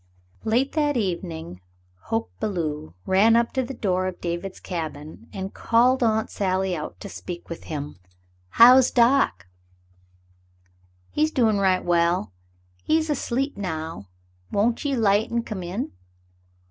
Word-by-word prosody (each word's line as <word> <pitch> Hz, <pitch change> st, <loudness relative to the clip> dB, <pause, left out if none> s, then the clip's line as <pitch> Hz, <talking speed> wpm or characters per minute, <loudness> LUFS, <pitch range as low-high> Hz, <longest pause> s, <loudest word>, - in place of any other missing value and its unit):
Late 240 Hz, +5 st, +1 dB
that 295 Hz, -3 st, +1 dB
evening, 170 Hz, -, -4 dB, 0.4 s
Hoke 225 Hz, 0 st, -2 dB
Belew 155 Hz, -, -3 dB
rode 205 Hz, +4 st, +5 dB
up 235 Hz, 0 st, +2 dB
to 260 Hz, -, +1 dB
the 260 Hz, +1 st, -5 dB
door 185 Hz, -4 st, 0 dB
of 185 Hz, -, -6 dB
David's 175 Hz, +2 st, -4 dB
cabin 155 Hz, -, -6 dB
and 190 Hz, 0 st, -6 dB
called 250 Hz, +3 st, +3 dB
Aunt 220 Hz, -2 st, +1 dB
Sally 190 Hz, -1 st, 0 dB
out 155 Hz, -1 st, -6 dB
to 205 Hz, -, -6 dB
speak 175 Hz, -2 st, -8 dB
with 170 Hz, -, -7 dB
him. 145 Hz, -, -6 dB, 0.5 s
"How's 250 Hz, -, +7 dB
doc?" 235 Hz, -, +3 dB, 1.7 s
"He's 310 Hz, +1 st, +2 dB
doin' 225 Hz, -8 st, +2 dB
right 190 Hz, -2 st, +2 dB
well. 170 Hz, -, +1 dB, 0.5 s
He's 315 Hz, 0 st, +1 dB
asleep 270 Hz, 0 st, -1 dB
now. 160 Hz, -, -5 dB, 0.4 s
Won't 230 Hz, +4 st, +1 dB
ye 280 Hz, -2 st, 0 dB
'light 210 Hz, -2 st, +2 dB
an' 235 Hz, 0 st, 0 dB
come 210 Hz, -5 st, -5 dB
in?" 180 Hz, +7 st, -4 dB
200 Hz, 135 wpm, -24 LUFS, 170-235 Hz, 1.7 s, How's